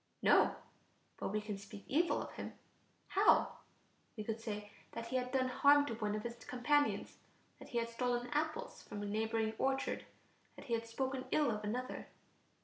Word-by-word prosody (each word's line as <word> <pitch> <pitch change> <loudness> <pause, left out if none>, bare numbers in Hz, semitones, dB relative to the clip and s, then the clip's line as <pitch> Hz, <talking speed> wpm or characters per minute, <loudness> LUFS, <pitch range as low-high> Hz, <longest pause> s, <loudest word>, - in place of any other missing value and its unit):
No, - - +6 0.6
but - - -2
we 210 +2 0
can 210 -2 -4
speak 200 0 -10
evil 335 +5 +2
of - - -8
him. - - -6 0.6
How? - - +4 0.6
We 215 - -3
could 225 +1 -3
say 210 -2 -5 0.2
that 230 0 -5
he 255 - -2
had 250 0 0
done 260 -1 +2
harm 285 +3 +6
to 285 - -3
one 210 -2 -1
of 215 - -3
his 235 0 -6
companions... 290 +4 +1 0.4
that - - -11
he 240 - -2
had 230 0 +1
stolen 245 0 0
apples 310 +11 -1
from 205 - -6
a - - -2
neighboring 220 +1 0
orchard... 270 0 0 0.5
that - - -11
he 235 - -2
had 230 0 0
spoken 260 +3 -2
ill 295 -5 +4
of 215 -1 -3
another. 250 +5 -3
235 Hz, 180 wpm, -36 LUFS, 215-265 Hz, 0.6 s, No